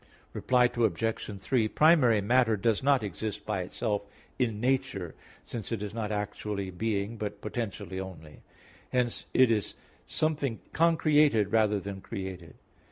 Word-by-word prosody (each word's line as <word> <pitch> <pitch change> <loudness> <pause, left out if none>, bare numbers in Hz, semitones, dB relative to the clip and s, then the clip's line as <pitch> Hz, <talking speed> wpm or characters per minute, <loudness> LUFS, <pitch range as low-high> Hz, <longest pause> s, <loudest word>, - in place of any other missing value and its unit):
Reply 125 -1 +2
Obj. 110 -1 -1
3: 115 +1 +1
Primary 130 -6 +5
matter 115 +1 +3
does 110 +1 +1
not 135 -3 +3
exist 105 +1 -4
by 105 -3 -1
itself 105 +3 -2 0.4
in 115 -5 0
nature, 125 -8 -1 0.3
since 115 -3 -6
it 110 -3 -2
is 105 - -5
not 110 -2 -3
actually 105 -1 -3
being, 105 +3 -2
but 105 -1 -4
potentially 105 -3 -4
only; 85 -5 -9 0.5
hence 125 -2 0
it 130 -2 +6
is 105 -4 -1 0.3
something 145 -7 0
concreated 150 - +3
rather 105 -2 +3
than 100 0 -7
created. 95 -6 -7
110 Hz, 135 wpm, -29 LUFS, 100-125 Hz, 0.5 s, it